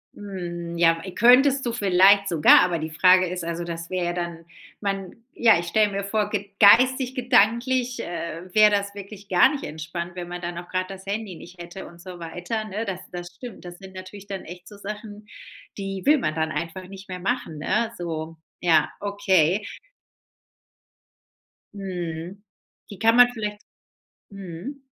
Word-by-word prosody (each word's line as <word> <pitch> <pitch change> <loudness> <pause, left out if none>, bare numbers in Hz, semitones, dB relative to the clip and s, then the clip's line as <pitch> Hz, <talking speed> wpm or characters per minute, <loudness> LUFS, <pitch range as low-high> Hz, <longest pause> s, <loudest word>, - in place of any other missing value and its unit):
Hm, 175 -4 -6
ja. 165 -1 +4
E 190 - -7
könntest 265 +3 +5
du 235 - 0
vielleicht 200 -1 +5
sogar, 165 -5 +6
aber 175 -2 +1
die 160 +1 -4
Frage 185 +4 +5
ist 180 -1 -4
also, 170 +1 -3
dass 165 -1 -6
wäre 185 -1 -1
ja 175 - -1
dann 170 -1 -5 0.3
man 195 -2 -3 0.2
ja, 225 -7 +6
ich 170 - -5
stelle 210 +3 +2
mir 200 0 -3
vor 210 +1 -1
ge 200 -1 -3
geistig 255 +5 +6
gedanklich, 250 0 +2
äh, 170 -1 -5
wäre 215 -1 +6
das 200 0 -1
wirklich 200 0 -10
gar 180 -1 +6
nicht 285 - -5
entspannt, 170 +3 -6
wenn 175 -1 -6
man 175 0 -7
dann 175 -1 -5
auch 175 - -8
grad 185 0 -2
das 190 -1 -9
Handy 200 -2 -4
nicht 175 +2 -12
hätte 175 +2 -9
und 170 0 -15
so 180 -1 -10
weiter, 180 +7 -4
ne? 215 +2 -4
Das 190 -2 -4
das 175 -1 -6
stimmt. 245 -4 -10
Das 175 0 -9
sind 190 0 -12
natürlich 190 +2 -10
dann 195 -2 -5
echt 175 +2 -11
so 205 - -12
Sachen, 210 +1 -8 0.5
die 195 -1 -4
will 300 +2 +6
man 155 - -1
dann 160 0 -1
einfach 175 +3 -5
nicht 195 0 -12
mehr 180 - -5
machen, 180 -6 -3
ne, 220 +7 0
so. 165 -2 -5 0.2
Ja, 160 -4 +3
okay. 195 -3 +2 2.1
Mhm. 180 -1 -6 0.5
Die 200 - -10
kann 225 +1 +4
man 245 0 +7
vieleicht 210 -2 -5 0.7
Mhm. 200 - -8
190 Hz, 175 wpm, -24 LUFS, 175-210 Hz, 2.1 s, man